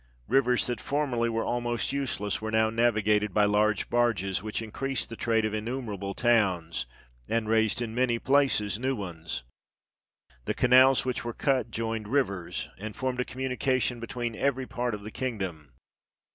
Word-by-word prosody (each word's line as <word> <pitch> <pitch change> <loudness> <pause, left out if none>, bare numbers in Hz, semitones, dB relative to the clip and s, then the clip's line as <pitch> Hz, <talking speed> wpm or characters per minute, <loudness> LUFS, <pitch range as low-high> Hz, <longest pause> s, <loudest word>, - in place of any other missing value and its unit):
"Rivers 125 0 +3
that 120 - -3
formerly 130 -5 0
were 115 0 -1
almost 120 -1 -1
useless 125 -8 -1
were 110 - -3
now 110 0 +2
navigated 105 -3 +2
by 105 -1 +5
large 105 0 +2
barges, 110 -6 +1
which 110 0 -3
increased 125 +4 -3
the 115 - -6
trade 115 -1 +1
of 110 - -2
innumerable 110 -3 -4
towns, 95 - +1 0.4
and 115 -1 0
raised 110 +2 +2
in 110 -1 -5
many 120 -1 +2
places 115 -7 +2
new 130 +2 0
ones. 85 - -5 1.0
The - - -1
canals 130 +1 +6
which 125 -1 -2
were 120 0 -4
cut 130 -5 +1
joined 115 -1 -3
rivers, 100 -9 -1
and 105 +1 -6
formed 130 -1 -2
a 125 - +1
communication 130 -1 -1
between 115 0 -4
every 135 +1 0
part 120 -2 -2
of 105 - -10
the 110 - -7
kingdom. 95 - -4
115 Hz, 160 wpm, -28 LUFS, 105-125 Hz, 1.0 s, canals